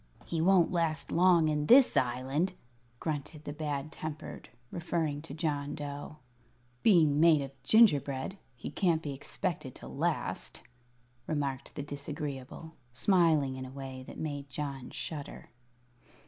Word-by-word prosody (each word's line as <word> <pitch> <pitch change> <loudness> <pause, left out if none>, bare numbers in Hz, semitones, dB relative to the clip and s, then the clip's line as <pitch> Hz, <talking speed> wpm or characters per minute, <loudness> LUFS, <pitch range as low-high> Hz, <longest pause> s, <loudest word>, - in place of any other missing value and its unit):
"He 165 -2 -1
won't 180 -1 +5
last 165 -3 0
long 170 -2 +5
in 150 -1 0
this 260 +1 +7
Island," 130 +8 +1 0.5
grunted 150 -1 -4
the 145 - -5
Bad 150 -1 -3
Tempered, 155 -2 -7 0.2
referring 160 -4 -1
to 150 -3 -9
John 145 -3 -2
Dough. 145 0 -6 0.6
"Being 160 -8 +5
made 160 -3 +6
of 135 - -7
gingerbread, 150 - +4 0.2
he 120 - -7
can't 165 -1 +1
be 145 - -3
expected 135 - -4
to - - -10
last," - - -2 0.6
remarked 140 -4 -2
the 145 - -3
Disagreeable, 145 +1 -6 0.2
smiling 150 -1 +3
in 130 - -5
a - - -10
way 135 -1 -7
that - - -9
made 145 -2 -4
John 135 -3 -4
shudder. 145 -5 -7
150 Hz, 135 wpm, -31 LUFS, 140-165 Hz, 0.6 s, this